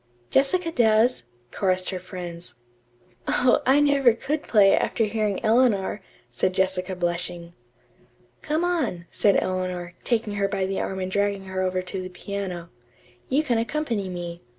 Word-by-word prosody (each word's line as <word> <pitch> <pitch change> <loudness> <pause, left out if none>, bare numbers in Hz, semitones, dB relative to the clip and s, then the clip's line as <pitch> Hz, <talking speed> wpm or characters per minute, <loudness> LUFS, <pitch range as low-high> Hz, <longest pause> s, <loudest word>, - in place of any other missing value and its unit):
"Jessica 330 +5 +3
does," 225 - +3 0.3
chorused 185 -1 0
her 185 - -4
friends. 180 -2 -7 0.7
"Oh, 250 0 +3
I 270 +2 +6
never 280 -4 +4
could 290 +6 -2
play, 205 -7 +5
after 225 - 0
hearing 215 -2 0
Eleanor," 220 -4 +2 0.3
said 185 +10 0
Jessica 185 0 0
blushing. 175 -1 -3 0.9
"Come 310 +3 -1
on," 290 - -1
said 200 -2 +3
Eleanor, 185 -2 -3
taking 225 -3 0
her 200 0 +2
by 195 -1 -1
the 195 0 -2
arm 190 - -3
and 185 0 -3
dragging 200 0 0
her 190 0 -3
over 185 0 0
to 185 +1 -5
the 185 - -6
piano. 180 -2 -6 0.6
"You 285 +4 +2
can 240 -6 +1
accompany 230 -6 -2
me. 175 -1 -6
195 Hz, 150 wpm, -25 LUFS, 185-235 Hz, 0.9 s, I